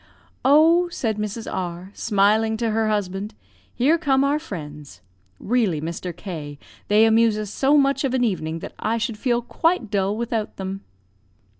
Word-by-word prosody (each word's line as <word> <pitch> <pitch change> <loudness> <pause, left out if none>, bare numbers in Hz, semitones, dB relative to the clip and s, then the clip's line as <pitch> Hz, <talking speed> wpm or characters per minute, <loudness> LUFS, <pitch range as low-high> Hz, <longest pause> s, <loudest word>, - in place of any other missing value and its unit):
"'Oh,' 325 +6 +5
said 225 -10 -2
Mrs. 210 +2 -4
R, 180 +1 -5
smiling 220 +2 +2
to 230 -1 -1
her 220 0 +1
husband, 205 0 -2 0.4
'here 305 +7 +3
come 275 -4 +2
our 285 +2 +1
friends. 150 - -9 0.4
Really, 215 -9 +1
Mr. 170 +3 -4
K, 155 -5 -7 0.3
they 210 +2 +5
amuse 225 -1 +4
us 210 -1 -4
so 275 +6 +3
much 275 -1 +2
of 260 -2 0
an 250 - +1
evening 165 -8 -1
that - - -8
I 225 +2 0
should 230 -1 -3
feel 240 -1 0
quite 320 - 0
dull 200 0 0
without 230 -2 -3
them.' 195 0 -5
220 Hz, 160 wpm, -23 LUFS, 195-250 Hz, 0.4 s, Oh